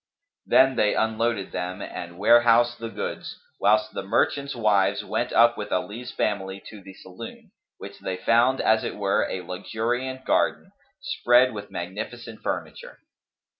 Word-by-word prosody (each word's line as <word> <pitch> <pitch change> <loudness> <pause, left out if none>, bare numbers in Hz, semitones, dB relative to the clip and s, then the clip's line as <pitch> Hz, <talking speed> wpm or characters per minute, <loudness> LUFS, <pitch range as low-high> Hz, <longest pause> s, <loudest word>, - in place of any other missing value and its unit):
Then 130 -1 +5
they 105 - +2
unloaded 110 -2 0
them 90 +3 -4
and 85 -3 -7
warehoused 120 +3 +4
the 115 0 -5
goods - - -5 0.2
whilst 105 +1 +2
the - - -3
merchants' 140 +7 0
wives 105 -4 +2
went - - -2
up 120 0 +5
with 105 - -5
Ali's 115 +6 -3
family 95 -2 -2
to 105 -2 -11
the 95 0 -13
saloon, 95 +4 -11 0.3
which - - -10
they 95 -1 -4
found 120 +7 +3
as 110 0 +3
it - - -4
were 100 -1 +1
a 95 - -4
luxuriant 120 +8 -3
garden, 190 - +1 0.3
spread 130 - +3
with 105 -1 -7
magnificent 110 +6 -7
furniture. - - -5
110 Hz, 145 wpm, -25 LUFS, 100-120 Hz, 0.3 s, Then